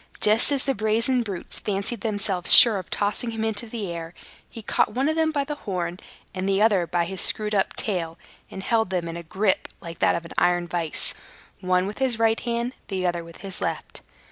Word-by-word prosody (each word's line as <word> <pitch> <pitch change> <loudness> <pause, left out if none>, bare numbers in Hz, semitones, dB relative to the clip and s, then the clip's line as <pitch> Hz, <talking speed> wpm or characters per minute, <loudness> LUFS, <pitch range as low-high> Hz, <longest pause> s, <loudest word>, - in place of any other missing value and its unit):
Just 215 +6 +4
as 275 -2 0
the 270 - 0
brazen 225 +4 0
brutes 200 -6 -4
fancied 200 +2 -3
themselves 205 -4 +3
sure 225 -5 +10
of 185 - -11
tossing 210 +3 -2
him 225 -1 -4
into 220 +1 -3
the 215 -6 -5
air, 170 0 -8 0.3
he 225 - -11
caught - - 0
one 265 +3 0
of 315 - 0
them 320 -1 +1
by 285 -2 -1
the 290 +2 -5
horn, 180 -9 -5 0.3
and 190 +1 -3
the 195 0 +1
other 205 -5 +2
by 175 0 -1
his 190 +1 -5
screwed 215 0 +2
up 195 -2 0
tail, 170 -5 -4 0.3
and 190 - -9
held 225 -2 0
them 180 -2 -3
in 165 - -6
a 170 - -6
gripe 190 +4 -1
like 170 0 -10
that - - +2
of 170 0 -5
an - - -10
iron 175 0 +1
vice, 170 -3 -3 0.5
one 185 0 0
with 205 +5 -7
his 260 -4 +1
right 225 0 +1
hand, 235 +1 -3
the 190 -2 -3
other 175 -1 -2
with 165 0 -14
his 195 -2 -6
left. - - -5
200 Hz, 220 wpm, -23 LUFS, 180-230 Hz, 0.5 s, sure